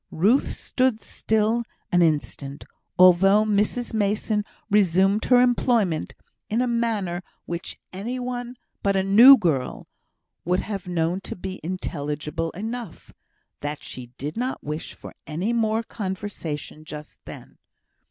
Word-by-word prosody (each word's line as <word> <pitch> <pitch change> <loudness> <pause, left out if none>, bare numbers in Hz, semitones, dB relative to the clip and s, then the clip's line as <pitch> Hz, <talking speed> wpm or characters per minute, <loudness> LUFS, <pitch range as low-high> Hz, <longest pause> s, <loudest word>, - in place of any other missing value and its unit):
Ruth 215 - +2
stood 255 -4 0
still 220 +2 0 0.3
an 175 - +4
instant, 145 -3 -1 0.3
although 190 +3 +6
Mrs 215 +4 0
Mason 210 0 0 0.2
resumed 195 0 +3
her 250 -1 +5
employment 235 -8 +2 0.3
in 220 - 0
a 250 - +2
manner 225 -7 -1 0.2
which 170 0 -5 0.2
any 220 +7 -4
one 245 0 -4 0.3
but 200 -1 +1
a 190 - +2
"new 235 +8 +9
girl" 155 - -1 0.6
would 180 +2 +1
have 200 -4 -5
known 175 +1 0
to - - -7
be 185 +1 -6
intelligible 155 -2 -3
enough, 225 0 -6 0.5
that 145 0 -5
she 125 -1 -7
did 145 +3 -5
not 255 +2 -2
wish 150 +2 -5
for - - -11
any 175 +9 -1
more 225 -1 +1
conversation 190 -8 -5
just 150 -1 -10
then. - - -11
195 Hz, 130 wpm, -24 LUFS, 165-225 Hz, 0.6 s, new